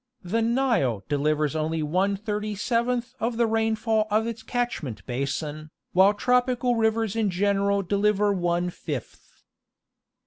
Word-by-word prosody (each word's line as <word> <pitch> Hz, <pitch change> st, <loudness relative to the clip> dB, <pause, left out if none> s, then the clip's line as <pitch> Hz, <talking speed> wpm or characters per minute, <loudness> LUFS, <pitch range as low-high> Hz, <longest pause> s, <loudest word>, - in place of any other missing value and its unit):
The 210 Hz, +6 st, 0 dB
Nile 230 Hz, -, +1 dB
delivers 150 Hz, +1 st, 0 dB
only 160 Hz, 0 st, -1 dB
one 185 Hz, +6 st, +1 dB
thirty 210 Hz, 0 st, -3 dB
seventh 240 Hz, +2 st, -1 dB
of 230 Hz, +1 st, -1 dB
the 235 Hz, -, +3 dB
rainfall 220 Hz, -1 st, +1 dB
of 215 Hz, +2 st, +2 dB
its 230 Hz, -1 st, -4 dB
catch 245 Hz, +1 st, -2 dB
ment 110 Hz, -, -7 dB
basin, 145 Hz, +4 st, -3 dB, 0.2 s
while 195 Hz, +3 st, +5 dB
tropical 250 Hz, +1 st, +2 dB
rivers 225 Hz, -1 st, +1 dB
in 220 Hz, -3 st, +1 dB
general 200 Hz, +1 st, +1 dB
deliver 205 Hz, +1 st, +2 dB
one 175 Hz, -1 st, 0 dB
fifth. 145 Hz, -8 st, -8 dB
205 Hz, 135 wpm, -25 LUFS, 165-225 Hz, 0.2 s, while